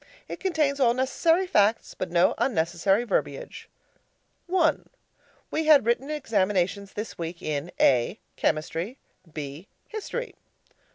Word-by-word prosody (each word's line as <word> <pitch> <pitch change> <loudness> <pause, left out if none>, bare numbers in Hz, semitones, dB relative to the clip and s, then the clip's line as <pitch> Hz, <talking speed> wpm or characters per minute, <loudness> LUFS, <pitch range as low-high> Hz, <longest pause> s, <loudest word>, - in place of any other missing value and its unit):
It - - -6
contains 310 -7 0
all 240 -3 +4
necessary 325 +8 +2
facts, 215 - +2
but 185 - -4
no 170 +1 +3
unnecessary 195 0 +1
verbiage. - - -3 0.8
I. 330 -5 +3 0.7
We 315 - -1
had 290 -7 +7
written 240 +4 0
examinations 200 -8 0
this 210 -2 -6
week 170 +1 -5
in: 150 +2 -3
A. 125 -3 +3 0.2
Chemistry. 165 - -1 0.3
B. 150 +4 -7 0.2
History. 465 +3 -5
215 Hz, 115 wpm, -26 LUFS, -, 0.8 s, had